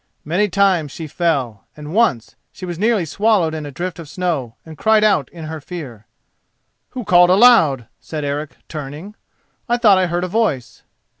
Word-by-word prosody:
Many 185 +7 +1
times 185 -6 +1
she 165 - -7
fell, 140 - -2
and 150 +1 -8
once 195 - +1 0.2
she 185 - -9
was 175 -2 -6
nearly 215 -4 +1
swallowed 195 -1 +1
in 155 -2 -5
a - - -8
drift 175 +4 -5
of 160 -3 -9
snow 155 -9 -3
and 160 -1 -10
cried 215 +6 +3
out 195 - +2
in 165 -2 -10
her 155 0 -6
fear. 135 - -9 0.9
"Who 250 - -3
called 175 -2 +5
aloud?" 180 - +5
said 155 -2 -6
Eric, 145 +1 -4
turning; 150 +6 -8 0.6
"I 240 - +2
thought 210 -6 +5
I 185 - +1
heard 175 +1 -2
a - - -1
voice." 175 - -2
170 Hz, 175 wpm, -19 LUFS, 145-195 Hz, 0.9 s, called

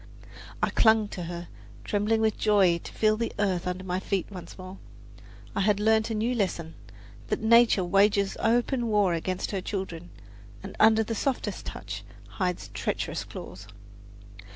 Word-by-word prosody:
I - - +2
clung 220 -2 +4
to 175 - -6
her, 175 0 -6 0.4
trembling 215 +2 +1
with 220 -2 +2
joy 195 -5 +3
to - - -10
feel 215 0 +2
the 230 0 -2
earth 190 -4 0
under 180 +1 -3
my 185 0 -2
feet 190 -1 -1
once 180 -3 -9
more. 185 0 -9 0.8
I - - +1
had 205 0 +2
learned 220 +1 +3
a 225 - -2
new 225 +4 0
lesson 170 -7 -2 0.5
that - - -1
nature 230 -3 +5
"wages 200 +2 +3
open 240 +2 +1
war 205 -5 +2
against 185 +2 -2
her 195 -2 -2
children, 180 -3 -5 0.5
and - - -8
under 220 +1 +6
softest 260 +4 -2
touch - - -6 0.3
hides 180 -3 -3
treacherous - - -2
claws." 100 +2 -10
200 Hz, 155 wpm, -27 LUFS, 185-220 Hz, 0.8 s, under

